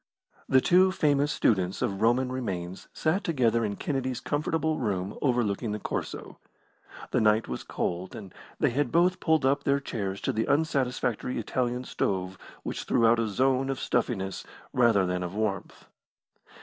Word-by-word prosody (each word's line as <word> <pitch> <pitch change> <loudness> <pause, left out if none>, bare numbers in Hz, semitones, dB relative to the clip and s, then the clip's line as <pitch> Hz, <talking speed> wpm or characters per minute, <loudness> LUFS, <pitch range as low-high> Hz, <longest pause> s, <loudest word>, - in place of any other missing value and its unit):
The 130 -1 +5
two 185 +5 +5
famous 145 -4 +2
students 95 -3 +1
of 100 0 -2
Roman 125 +3 +2
remains 95 -8 -4
sat 165 +5 0
together 120 -7 +2
in 100 -2 -2
Kennedy's 130 -2 -2
comfortable 155 +3 -1
room 100 -3 -2
overlooking 120 -5 0
the 105 - -3
Corso. - - -5 0.7
The - - +2
night 110 +1 +3
was 65 - -4
cold, 90 +2 -3
and 100 -4 -9 0.3
they - - +2
had 140 0 0
both 180 +2 +3
pulled 160 -4 +2
up 140 +1 +2
their 140 0 +2
chairs 100 -7 -4
to - - -1
the 110 +1 -1
unsatisfactory 130 -5 0
Italian 125 0 -1
stove 95 -6 -2 0.2
which - - -4
threw 120 -2 +3
out 115 +1 +5
a 115 - +1
zone 130 +5 +1
of 135 - -2
stuffiness 95 -5 -1 0.3
rather 115 -6 +4
than 90 0 -1
of 90 +2 -5
warmth. 105 -3 -3
120 Hz, 160 wpm, -28 LUFS, 100-140 Hz, 0.7 s, The